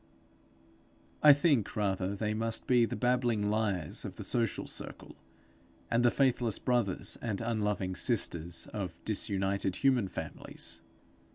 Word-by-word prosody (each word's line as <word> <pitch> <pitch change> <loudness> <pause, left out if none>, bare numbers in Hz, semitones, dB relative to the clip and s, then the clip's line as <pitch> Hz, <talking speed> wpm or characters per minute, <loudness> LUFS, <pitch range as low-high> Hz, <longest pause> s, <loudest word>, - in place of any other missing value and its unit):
I 150 - +9
think, 145 - +2
rather, 100 -1 0
they 105 +1 -1
must 115 +1 -1
be 120 -2 +4
the - - -4
babbling 120 -4 +1
liars 100 -8 -1
of - - -6
the - - -7
social 115 -3 -1
circle, - - -6 0.8
and 115 +1 +3
the 120 - +6
faithless 120 -4 +2
brothers 120 -7 0
and 110 -4 -2
unloving 105 -5 -1
sisters 85 -1 0
of 90 -6 -4
disunited 100 -2 0
human 130 -7 +2
families. - - -6
110 Hz, 125 wpm, -31 LUFS, 95-120 Hz, 0.8 s, I